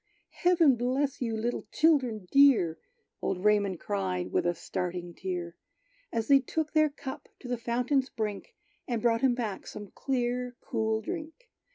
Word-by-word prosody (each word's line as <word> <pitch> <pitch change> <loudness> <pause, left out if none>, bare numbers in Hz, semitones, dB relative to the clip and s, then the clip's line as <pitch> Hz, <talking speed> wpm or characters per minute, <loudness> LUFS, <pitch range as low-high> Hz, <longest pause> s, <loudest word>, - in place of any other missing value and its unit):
"Heaven 335 -7 +4
bless 260 +4 0
you, 225 -3 -1
little 235 +2 -2
children 255 - +2
dear!" 245 - +5 0.4
Old 180 0 -2
Raymond 200 -4 +3
cried, 95 -2 -2
with - - +1
a 175 - +1
starting 175 0 -4
tear, 175 -1 -4 0.6
As 225 -1 -1
they 275 -1 +7
took 305 +4 -3
their 310 -1 +4
cup 275 -2 -8
to - - -10
the 245 - 0
fountain's 250 +3 0
brink, 220 - -4 0.3
And 235 -2 -1
brought 230 0 +2
him 260 -2 +3
back 220 -5 -4
some 205 -1 -8
clear, 250 -1 -2
cool 220 -1 0
drink. 330 - -7
235 Hz, 155 wpm, -29 LUFS, 200-270 Hz, 0.6 s, they